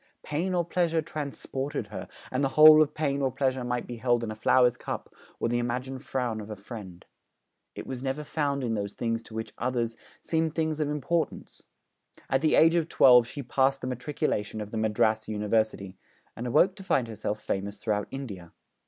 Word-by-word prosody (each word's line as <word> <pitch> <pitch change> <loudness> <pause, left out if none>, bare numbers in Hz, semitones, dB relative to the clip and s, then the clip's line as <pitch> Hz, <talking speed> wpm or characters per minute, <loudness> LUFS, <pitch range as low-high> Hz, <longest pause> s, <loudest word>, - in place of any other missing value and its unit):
Pain 175 +5 -1
or 175 -1 +1
pleasure 165 -2 +1
transported 145 -3 -4
her, 105 - -6 0.2
and 130 +2 0
the 135 - +2
whole 155 0 +10
of 150 -1 +1
pain 140 -2 0
or 135 -1 +1
pleasure 130 -1 0
might 125 0 -2
be 120 - -7
held 120 0 +1
in 110 - -3
a - - -5
flower's 125 +3 +4
cup - - -6 0.3
or - - 0
the 120 +1 0
imagined 125 +2 -3
frown 120 -6 -2
of 105 - -9
a 105 - -5
friend. 100 -4 -10 0.7
It - - -7
was 130 -2 -5
never 135 +3 -2
found 145 -2 -1
in 115 -2 -1
those 100 -2 -3
things 115 -1 -1
which 110 0 -4
to - - -24
others 120 -2 -1 0.2
seemed 160 -1 -1
things 160 -1 -1
of 150 -1 0
importance. 155 +3 -2 0.7
At 135 0 +3
the 155 - +3
age 165 +1 +6
of 170 -2 +1
twelve 125 -3 +6
she 140 +3 -6
passed 135 +2 +1
the - - -4
Matriculation 125 -4 -2
of 105 -1 -6
the 115 - -3
Madras 110 0 +1
University, 105 -2 -1 0.4
and 120 +2 -5
awoke 175 +10 +4
to 195 - -9
find 130 -10 +1
herself 105 -1 -4
famous 100 0 -3
throughout 105 -2 -1
India. 100 -11 -7
125 Hz, 195 wpm, -28 LUFS, 110-150 Hz, 0.7 s, whole